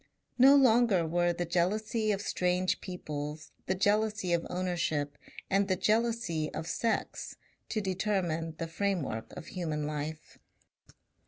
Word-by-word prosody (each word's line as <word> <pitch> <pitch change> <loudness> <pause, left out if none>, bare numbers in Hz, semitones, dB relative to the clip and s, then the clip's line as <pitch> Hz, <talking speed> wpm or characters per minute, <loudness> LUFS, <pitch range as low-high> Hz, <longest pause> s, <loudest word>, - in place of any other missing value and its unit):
No 270 +3 +9
longer 235 -9 +5
were 175 +2 +2
the 175 +1 -2
jealousy 210 +6 +1
of 200 -1 -1
strange 180 0 0
peoples, 150 -4 -6 0.2
the 190 - +1
jealousy 205 -1 +1
of 170 -1 0
ownership 165 -5 -1 0.3
and 195 0 +2
the 190 - +2
jealousy 215 -7 0
of 160 - -4
sex 230 +6 -2 0.3
to 215 - -1
determine 180 -5 -1
the 165 - -3
framework 165 - -2
of 175 - -7
human 155 -5 -3
life. 150 +1 -5
180 Hz, 130 wpm, -31 LUFS, 160-210 Hz, 0.3 s, No